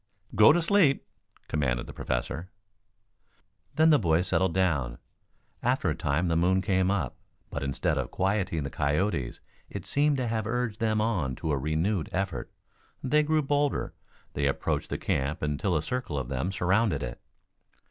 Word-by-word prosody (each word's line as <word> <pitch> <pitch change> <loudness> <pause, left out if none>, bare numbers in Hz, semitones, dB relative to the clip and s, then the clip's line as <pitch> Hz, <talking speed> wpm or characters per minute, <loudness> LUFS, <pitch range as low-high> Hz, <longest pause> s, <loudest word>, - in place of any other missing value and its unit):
"Go 105 +1 +8
to 170 +2 +2
sleep!" 170 -7 +3 0.4
commanded 65 -5 0
the - - -9
Professor. 70 +8 -3 1.3
Then 160 +1 +5
the 150 - +6
boys 85 -2 +2
settled 95 -2 +1
down. 70 -11 +1 0.6
After - - +1
a - - -2
time 80 +6 0
the 85 - +1
moon 95 +3 +3
came 95 -2 +2
up, 90 -11 -1 0.3
but - - -3
instead 70 -1 0
of - - -3
quieting 95 -5 0
the 70 - -5
coyotes 75 -2 -1 0.3
it - - -6
seemed 145 0 +2
to 130 - -1
have 110 -1 -1
urged 115 -2 -2
them 110 -1 +1
on 90 - 0
to 75 - -2
renewed 80 +6 0
efforts. 95 -1 -3 0.5
They 150 +3 +3
grew 155 0 +1
bolder. 145 0 0 0.4
They 70 0 0
approached 70 - -1
the - - -2
camp 70 +5 -1
until 75 +4 0
a 75 - -2
circle 125 - -3
of 65 -3 -3
them 70 +8 -1
surrounded 95 - +1
it. - - -6
90 Hz, 160 wpm, -28 LUFS, 75-110 Hz, 1.3 s, Go